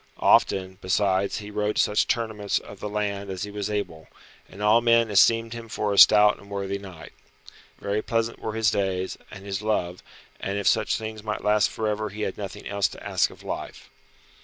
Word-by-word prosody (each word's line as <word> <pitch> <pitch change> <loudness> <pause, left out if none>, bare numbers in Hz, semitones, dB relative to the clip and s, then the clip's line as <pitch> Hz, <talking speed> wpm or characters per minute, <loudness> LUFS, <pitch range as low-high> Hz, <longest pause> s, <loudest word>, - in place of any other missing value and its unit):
Often, 95 0 +2
besides, 95 +1 +1
he 105 0 -7
rode 105 0 -1
to - - +4
such 105 - +1
tournaments 110 -3 -1
of 100 - -9
the 105 - -5
land 100 -1 -3
as 95 0 -4
he 105 - -6
was 105 0 -4
able, 95 -7 -4 0.4
and 95 - -13
all 110 +3 +5
men 115 -1 +3
esteemed 115 +3 +4
him 115 -1 -8
for 105 -1 -1
a - - -3
stout 105 -1 +7
and 100 - -16
worthy 100 0 -3
knight. 90 -7 -11 0.7
Very 100 +1 -1
pleasant 115 +1 -2
were 110 - -4
his 110 0 +2
days, 95 -2 -2
and 100 -1 -11
his 100 0 -3
love, 90 -5 -1 0.4
and 100 +1 -3
if 100 - -3
such 110 -1 +2
things 110 -1 -6
might 105 0 -4
last 105 -1 +3
for 110 - -3
ever 105 0 -2
he 105 +2 -6
had 95 - -2
nothing 100 -3 -7
else 100 -1 +1
to - - -10
ask - - +2
of - - -15
life. - - -7
105 Hz, 205 wpm, -25 LUFS, 100-110 Hz, 0.7 s, stout